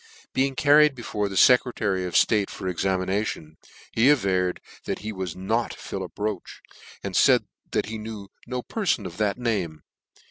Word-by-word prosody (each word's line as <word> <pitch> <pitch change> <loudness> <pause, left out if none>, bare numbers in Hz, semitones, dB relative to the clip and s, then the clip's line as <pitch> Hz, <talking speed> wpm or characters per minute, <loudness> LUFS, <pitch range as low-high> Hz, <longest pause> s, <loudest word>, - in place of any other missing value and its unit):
Being 135 0 +1
carried 145 +1 +5
before 105 -4 -3
the 95 - -4
Secretary 105 -6 +3
of 90 - -6
ftate 105 -3 +3
for 95 - -6
examination, 95 -3 -2 0.3
he 120 +5 +4
averred 95 -9 +2 0.3
that - - -2
he 110 - -2
was 95 -4 -4
not 110 +6 -1
Philip - - -7
Roche, 105 -3 -4 0.4
and - - -4
faid - - +5 0.3
that - - 0
he 110 0 -6
knew 105 -2 -7 0.2
no 125 0 -3
per 215 -4 -4
fon 105 - +2
of 90 -2 -7
that 105 -1 0
name. 100 -10 -2
105 Hz, 165 wpm, -25 LUFS, 95-120 Hz, 0.4 s, carried